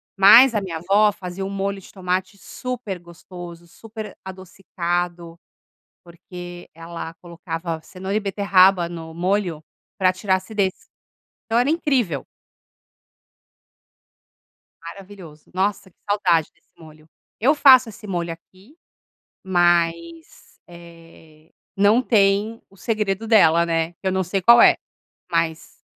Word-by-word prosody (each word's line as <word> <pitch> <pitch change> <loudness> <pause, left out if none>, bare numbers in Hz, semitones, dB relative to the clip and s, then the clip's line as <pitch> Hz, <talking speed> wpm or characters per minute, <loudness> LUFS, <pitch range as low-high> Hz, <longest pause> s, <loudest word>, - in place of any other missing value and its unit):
Mas 230 +6 +7
a 210 - 0
minha 175 -4 -5
a - - -8
avó 200 +5 +3
fazia 185 0 -7
um 195 - -4
molho 195 0 -3
de - - -16
tomate 190 +1 -3
super 245 -5 -6
gostoso, 175 0 -12
super 215 +2 -10
adocicado, 175 -2 -5 0.6
porque 175 0 -11
ela 165 0 -8
colocava 170 -1 -6
cenoura 190 +3 -5
e 215 - +1
beterraba 195 -3 +3
no 165 -2 -9
molho 175 -2 -2 0.4
para 185 -1 +3
tirar 190 0 0
acidez. 190 0 -2 0.7
Então 225 +1 +1
era 245 - +2
incrível. 265 - 0 2.6
Maravilhoso. 170 -3 -12
Nossa, 195 +1 -2
que - - -36
saudade 175 -6 +1
desse - - -37
molho. 155 -1 -16 0.3
Eu 265 +7 +3
faço 260 -5 +6
esse 210 0 -12
molho 175 -3 -3
aqui 190 - -20 0.7
mas, 170 -2 -1
eh, 165 -2 -17 0.2
não 205 +5 +4
tem 210 0 +1
o 195 - -23
segredo 210 +1 -2
dela, 170 -7 +5
né. 165 -1 -1
Que 190 +3 -7
eu - - +1
não 190 0 0
sei 190 +2 -2
qual 235 +5 +7
é, - - +7 0.6
mas 165 -1 -3
185 Hz, 125 wpm, -21 LUFS, 170-205 Hz, 2.6 s, Mas